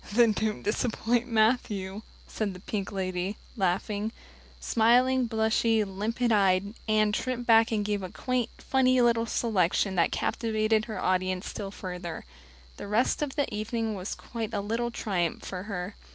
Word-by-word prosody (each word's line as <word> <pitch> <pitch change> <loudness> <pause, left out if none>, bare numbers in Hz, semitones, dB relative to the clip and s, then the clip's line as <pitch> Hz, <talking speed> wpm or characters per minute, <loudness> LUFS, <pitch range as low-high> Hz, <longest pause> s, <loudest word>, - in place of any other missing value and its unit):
"Then 235 0 +5
don't 215 0 -2
disappoint 235 +2 0
Matthew," 215 -4 +1 0.3
said 205 -4 -3
the - - -9
pink 200 0 -4
lady, 185 +1 -2 0.2
laughing. 205 +2 -1 0.5
Smiling, 245 +3 +3
blushing, 220 -3 +1
limpid 230 +3 0
eyed, 200 -1 +3
Anne 215 -1 +3
tripped 245 +2 -2
back 225 0 +5
and 210 -2 0
gave 205 -1 -1
a 185 - -5
quaint, 250 +4 -1
funny 255 -1 +2
little 230 -1 +3
selection 195 -4 +1
that 170 - +3
captivated 215 -1 0
her 220 - -5
audience 185 0 0
still 200 - -5
further. 180 - -6 0.5
The - - -7
rest 220 +8 +1
of 290 -3 -2
the 285 -2 +2
evening 220 +1 -2
was 190 -1 -4
quite 225 -2 -5
a 200 - 0
little 230 +4 -1
triumph 185 -8 -2
for 180 -1 -5
her. 200 -1 -4
215 Hz, 150 wpm, -28 LUFS, 195-230 Hz, 0.5 s, Then